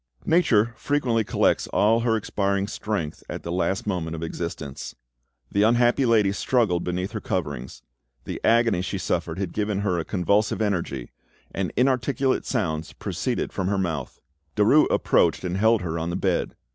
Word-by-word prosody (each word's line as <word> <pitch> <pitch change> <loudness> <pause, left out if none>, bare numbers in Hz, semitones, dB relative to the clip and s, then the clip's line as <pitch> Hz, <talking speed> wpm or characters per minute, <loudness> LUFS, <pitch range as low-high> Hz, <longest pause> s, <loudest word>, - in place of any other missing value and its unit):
Nature 120 -10 +3
frequently 125 -6 +1
collects - - +1
all 110 +3 +3
her 115 -1 +1
expiring 100 -2 -1
strength 100 -8 -4
at - - -5
the 85 - -4
last 95 +2 -1
moment 85 -5 -2
of 80 - -5
existence. 80 -4 -5 0.6
The 100 - +2
unhappy 120 +4 +3
lady 110 -4 +4
struggled 100 -4 +1
beneath 90 +3 -2
her 110 -2 -5
coverings; 70 - -4 0.4
the - - -6
agony 115 -4 +3
she 95 +2 -3
suffered 85 -2 -2
had 95 -3 -3
given 105 -2 -1
her 90 -4 0
a - - -2
convulsive 100 +4 +1
energy, 85 - -2 0.4
and 95 -2 -2
inarticulate 130 +1 +1
sounds 80 0 -2
proceeded - - -3
from 95 - -2
her 100 0 +1
mouth. 80 -8 -3 0.4
Derues - - +5
approached - - +2
and 90 0 -2
held 110 +1 +3
her 85 -1 -2
on 80 +1 -2
the 85 - -2
bed. - - -1
100 Hz, 160 wpm, -24 LUFS, 85-110 Hz, 0.6 s, Derues